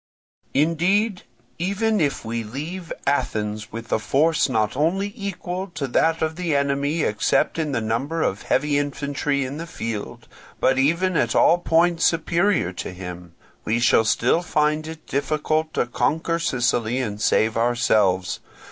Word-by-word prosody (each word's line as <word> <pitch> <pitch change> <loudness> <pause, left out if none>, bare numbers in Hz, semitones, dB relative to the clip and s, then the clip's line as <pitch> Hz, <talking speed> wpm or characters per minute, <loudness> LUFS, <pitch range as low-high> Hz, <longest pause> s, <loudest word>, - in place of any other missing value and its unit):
"Indeed, 180 +7 +2 0.4
even 205 +4 0
if 145 -5 -1
we 115 +1 -3
leave 160 +10 -6
Athens 105 -6 -1
with 115 0 -8
a - - +2
force 145 +8 +2
not 110 -3 0
only 190 +8 0
equal 190 -3 -4
to 145 -3 -2
that 160 +6 +2
of 160 +1 -2
the 170 -5 0
enemy 140 +3 0
except 105 +9 +1
in 155 -2 -1
the 120 -4 -1
number 135 +9 -1
of 100 - -1
heavy 145 +2 +1
infantry 140 0 -1
in 135 +3 -5
the 165 +1 -6
field, 115 -9 -6 0.3
but 130 0 +3
even 170 +6 +2
at 120 -7 +1
all 175 - +5
points 170 0 +2
superior 170 - +2
to 90 - -5
him, 90 -2 -9 0.3
we 110 +2 0
shall 115 -1 +4
still 115 +8 +2
find 155 -2 0
it 160 0 -9
difficult 155 +3 -1
to - - +2
conquer 165 +7 0
Sicily 125 -5 0
or 105 -4 -4
save 110 +1 +2
ourselves. 110 -6 +2
145 Hz, 150 wpm, -23 LUFS, 115-165 Hz, 0.4 s, all